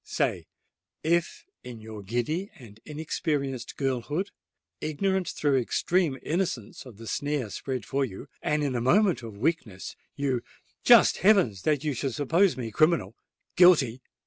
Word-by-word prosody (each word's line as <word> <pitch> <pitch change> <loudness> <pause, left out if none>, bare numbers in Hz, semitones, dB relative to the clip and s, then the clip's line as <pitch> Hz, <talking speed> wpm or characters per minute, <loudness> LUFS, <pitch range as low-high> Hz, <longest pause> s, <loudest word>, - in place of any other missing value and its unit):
Say—if 170 +1 -3 0.2
in 120 -2 -9
your 110 -1 -9
giddy 120 - -2
and 110 -5 -14
inexperienced 145 -4 -3
girlhood—ignorant 155 - -3
through 140 -3 +1
extreme 160 +4 0
innocence 155 - -3
of 115 -5 -13
the 115 - -10
snare 145 -3 -2
spread 130 -2 -4
for 135 +7 0
you—and 145 - -3
in 140 -2 -1
a 120 - -1
moment 185 - +3
of 110 -3 -9
weakness—you——" 130 - -3 0.4
"Just - - +7
heavens! 185 - +3
that 150 - +1
you 150 -2 0
should 135 -2 -3
suppose 165 +2 +2
me 115 -3 -4
criminal—guilty!" 155 - +2
140 Hz, 120 wpm, -27 LUFS, 120-165 Hz, 0.4 s, Just